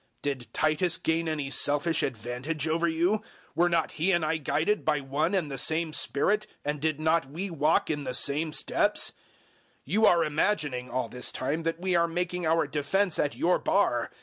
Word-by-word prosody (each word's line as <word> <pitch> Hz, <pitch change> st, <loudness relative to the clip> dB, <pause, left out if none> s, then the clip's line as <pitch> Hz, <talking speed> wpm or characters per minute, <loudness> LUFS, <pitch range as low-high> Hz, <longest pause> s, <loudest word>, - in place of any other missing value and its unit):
Did 135 Hz, -4 st, -4 dB
Titus 155 Hz, +3 st, +1 dB
gain 165 Hz, -2 st, -1 dB
any 145 Hz, -3 st, -3 dB
selfish 145 Hz, +4 st, +2 dB
advantage 130 Hz, +6 st, -3 dB
over 165 Hz, +2 st, +1 dB
you? 175 Hz, +6 st, +1 dB, 0.3 s
Were 175 Hz, +3 st, +2 dB
not 170 Hz, -2 st, 0 dB
he 170 Hz, +5 st, 0 dB
and 175 Hz, -3 st, +2 dB
I 160 Hz, +1 st, 0 dB
guided 160 Hz, +7 st, 0 dB
by 150 Hz, -1 st, +1 dB
one 145 Hz, +7 st, -1 dB
and 165 Hz, -7 st, -1 dB
the 135 Hz, -, 0 dB
same 160 Hz, +2 st, +1 dB
Spirit, 210 Hz, +10 st, +1 dB, 0.2 s
and 150 Hz, -1 st, -2 dB
did 155 Hz, -1 st, 0 dB
we 155 Hz, -, -8 dB
not 160 Hz, -1 st, +2 dB
walk 160 Hz, 0 st, 0 dB
in 145 Hz, -2 st, -3 dB
the 130 Hz, -2 st, -3 dB
same 150 Hz, +5 st, +1 dB
steps? -, -, +1 dB, 0.7 s
012:019 145 Hz, -, -7 dB
You 220 Hz, +2 st, +4 dB
are 170 Hz, -1 st, +4 dB
imagining, 150 Hz, -5 st, -1 dB
all 130 Hz, -2 st, -2 dB
this 125 Hz, +2 st, -2 dB
time, 140 Hz, +5 st, -2 dB
that 165 Hz, 0 st, -2 dB
we 185 Hz, 0 st, 0 dB
are 170 Hz, 0 st, +3 dB
making 180 Hz, 0 st, -2 dB
our 165 Hz, 0 st, +2 dB
defense 155 Hz, +6 st, 0 dB
at 145 Hz, -, 0 dB
your 180 Hz, +2 st, +2 dB
bar. 120 Hz, -12 st, +1 dB
160 Hz, 190 wpm, -28 LUFS, 145-170 Hz, 0.7 s, You